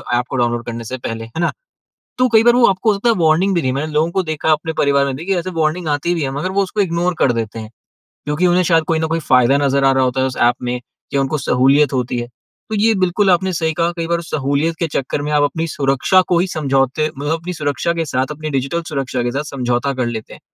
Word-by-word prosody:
App 120 - +1
को - - -4
download 120 -1 0
करने 115 0 -5
से 125 +4 -5
पहले, 115 -2 -5
है 115 +8 -8
ना? 170 - +1 0.7
तो 255 0 +3
कई 220 - +7
बार 240 0 +6
वो 245 - +6
आपको 195 +3 +2
हो - - 0
सकता 235 - 0
है, - - +3
वार्निंग 175 +5 +3
भी 170 - +1
नहीं। 130 - 0
मैंने 150 +4 -3
लोगों 155 +3 +1
को 190 - +1
देखा, 155 -1 0
अपने 155 +1 -1
परिवार 140 -1 +3
में 135 - -2
भी, 170 +7 -3
ऐसे 175 +1 -3
वार्निंग 160 +2 0
आती 150 +4 0
भी 165 - -2
हैं, 135 - -1
मगर 185 - -2
वो 200 - +5
उसको 195 +2 -3
इग्नोर 175 -1 0
कर 130 - +3
देते 115 -1 -4
हैं, 110 -1 -8 0.6
क्योंकि 150 +5 +1
उन्हें 180 +1 +3
शायद 165 -1 +3
कोई 160 - +1
न 160 - 0
कोई 165 +1 -1
फ़ायदा 125 +2 +5
नज़र 140 0 +1
आ 135 - +5
रहा 130 0 +2
होता 130 +1 0
है 130 - +2
उस 130 - -6
एप 120 +1 +4
में, 125 0 -2 0.3
कि - - 0
उनको 135 +3 0
सहूलियत 135 +3 +3
होती 125 -1 -1
है। 120 - -5 0.4
तो 220 - -2
ये 220 +2 +3
बिल्कुल 190 +1 +1
आपने 185 +2 +2
सही 160 -1 -1
कहा। 170 +1 0
कई 165 - -2
बार 170 0 0
सहूलियत 150 0 -1
के 170 - 0
चक्कर 140 -1 -2
में 150 +1 -3
आप 145 -1 +3
अपनी 160 +3 -1
सुरक्षा 140 +5 +2
को 175 - +2
ही, 180 - +1
समझौते, 140 -3 0
मतलब 145 +2 -3
अपनी 170 +2 -4
सुरक्षा 150 +1 -1
के 165 -1 -2
साथ, 130 -1 -1
अपनी 155 +1 -5
डिजिटल 140 +4 -1
सुरक्षा 135 -4 -2
के 120 - -1
साथ 140 +4 -2
समझौता 125 0 -1
कर 125 -2 -1
लेते 110 -2 -6
हैं। - - -13
150 Hz, 265 wpm, -18 LUFS, 130-170 Hz, 0.7 s, कई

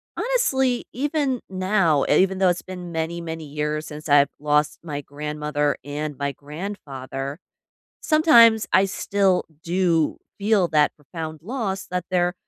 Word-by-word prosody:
honestly, 265 - +1
even 280 -1 -1
now, 185 -5 +2
even 190 +5 +3
though 190 -1 +4
it's 175 0 0
been 180 -2 -8
many, 165 +1 -3
many 160 -1 -6
years 150 +1 -3
since 150 0 -8
I've 145 -1 +6
lost 150 0 +1
my 145 -3 -4
grandmother 150 0 -2
and 145 +1 -4
my 140 0 -1
grandfather, 140 -3 -6 0.6
sometimes 235 -9 +6
I 190 - +6
still 195 -1 +1 0.2
do 170 -3 +1 0.2
feel 205 -3 +3
that 150 -1 +3
profound 155 +1 -7
loss 205 -4 -3
that 180 -1 -2
they're 180 -1 +1
170 Hz, 135 wpm, -23 LUFS, 150-195 Hz, 0.6 s, I've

